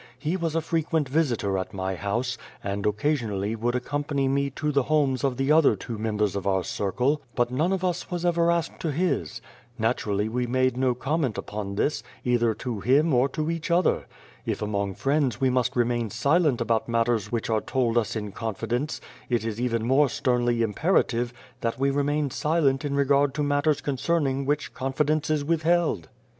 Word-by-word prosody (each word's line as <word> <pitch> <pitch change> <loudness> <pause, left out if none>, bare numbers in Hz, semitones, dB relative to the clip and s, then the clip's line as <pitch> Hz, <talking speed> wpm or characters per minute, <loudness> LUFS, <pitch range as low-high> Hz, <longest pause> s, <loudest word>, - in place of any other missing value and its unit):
He 155 +6 -2
was 165 -3 -2
a 165 - +2
frequent 160 -2 0
visitor 125 -10 0
at 95 - -6
my 95 0 -2
house, 120 +7 -2 0.3
and 100 +1 -2
occasionally 105 -3 0
would 120 +2 -1
accompany 145 +2 -1
me 140 +1 +1
to 150 +3 -2
the 140 -1 +3
homes 140 -4 +2
of 135 -3 0
the 135 +2 +1
other 155 -1 +5
two 115 -4 -6
members 105 -3 0
of 100 -1 -3
our 95 -1 +2
circle; 125 +12 0
but 120 0 +1
none 155 +8 +1
of 190 -1 -1
us 180 -1 -1
was 175 -1 -3
ever 170 -1 +3
asked 170 -1 0
to 160 - -1
his. 150 - -1 0.3
Naturally 105 +1 0
we 125 +2 -1
made 130 0 +1
no 130 -1 +1
comment 135 -1 -1
upon 100 -1 -5
this, 145 +8 0 0.2
either 120 -2 +2
to 120 -5 -4
him 140 - +3
or 125 +2 +3
to 155 +4 -2
each 165 +1 -4
other. 170 +1 +2 0.4
If - - -2
among 100 -2 -2
friends 135 -4 0
we 130 -1 +2
must 125 -1 0
remain 120 -2 +1
silent 140 - +2
about 115 0 0
matters 115 -2 +1
which 115 -1 -2
are 110 -1 +2
told 125 -3 0
us 115 -3 +1
in 105 -2 -4
confi 110 0 -5
dence, 125 +6 -1 0.3
it 120 -3 0
is 115 0 -3
even 115 -2 0
more 135 +3 +4
sternly 120 -2 +1
imperative 120 - +1 0.3
that 115 -1 -2
we 135 +1 +2
remain 145 0 0
silent 150 -3 +1
in 140 -1 -1
regard 140 0 +3
to 150 - 0
matters 145 +1 +1
concern 145 +3 0
ing 135 0 -1
which 145 0 -1
confidence 150 +4 0
is 150 -2 +1
withheld. 165 - +1
130 Hz, 190 wpm, -26 LUFS, 115-150 Hz, 0.4 s, other